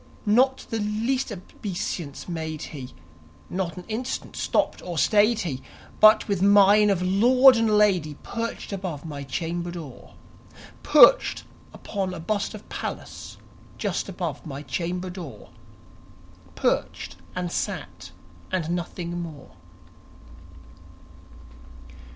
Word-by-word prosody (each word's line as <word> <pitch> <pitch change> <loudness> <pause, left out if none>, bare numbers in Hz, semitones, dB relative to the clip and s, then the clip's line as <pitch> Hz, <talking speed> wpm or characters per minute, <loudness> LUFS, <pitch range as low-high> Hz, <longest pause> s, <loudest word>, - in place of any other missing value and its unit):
Not 255 +5 +3
the 225 - -1
least 225 +5 -1
obeisance 175 -5 -5
made 160 -3 -4
he; 130 -4 -8 0.6
not 180 -3 -2
an 180 - -7
instant 240 +4 -4
stopped - - 0
or 175 -2 -6
stayed 215 +6 +4
he; 140 -9 -4 0.4
But, 215 0 +7
with 200 -4 -1
mien 205 +1 +6
of 185 -3 +1
lord 250 +8 +6
and 230 -1 +2
lady, 180 -8 +2
perched 230 -2 -4
above 180 -6 -5
my 145 -3 -6
chamber 170 +5 -3
door 165 -7 -9 0.7
Perched - - +6 0.3
upon 190 -2 -4
a - - -7
bust 200 +5 -2
of - - -12
Pallas - - -6 0.4
just - - -2
above - - -4
my 145 -2 -7
chamber 180 +3 -3
door 175 -7 -9 1.0
Perched 80 - -1 0.2
and 180 -1 -3
sat - - -4 0.4
and 170 -3 -1
nothing 175 0 -3
more. 155 -5 -9
180 Hz, 115 wpm, -25 LUFS, 165-210 Hz, 1.0 s, But